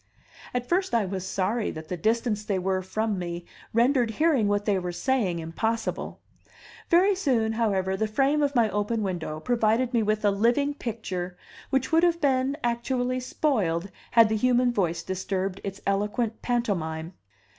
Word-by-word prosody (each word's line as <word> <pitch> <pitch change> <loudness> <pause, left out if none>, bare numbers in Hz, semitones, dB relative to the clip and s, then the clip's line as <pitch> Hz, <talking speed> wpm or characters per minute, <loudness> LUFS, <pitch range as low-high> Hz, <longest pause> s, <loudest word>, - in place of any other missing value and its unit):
At 245 0 -1
first 370 -4 +1
I 225 -3 +2
was 190 0 -4
sorry 210 +4 0
that 155 0 -7
the 180 - -2
distance 220 +3 0
they 205 -2 -1
were 185 0 0
from 210 +1 -2
me 175 -1 -5 0.3
rendered 240 +1 +3
hearing 270 -2 +2
what 205 0 0
they 200 -3 +2
were 180 -1 -3
saying 205 -3 0
impossible; 220 +8 -3 0.7
very 370 +4 +5
soon, 250 - +1
however, 195 -4 0
the 220 +3 0
frame 275 +7 +2
of 285 -1 +1
my 235 -2 +4
open 210 +2 -1
window 170 -5 -3
provided 235 +4 +1
me 235 - +3
with 215 0 0
a 205 - +5
living 240 +8 +2
picture 190 -9 -5 0.3
which 270 +1 0
would 325 +1 +5
have 340 -1 +3
been 270 -1 +1
actually 245 +1 0
spoiled 200 - 0 0.2
had 230 -1 +6
the 220 - 0
human 250 +2 +3
voice 175 -7 -1
disturbed 190 0 -3
its 195 0 -6
eloquent 210 +3 -1
pantomime. 175 -9 -2
220 Hz, 165 wpm, -26 LUFS, 190-250 Hz, 0.7 s, had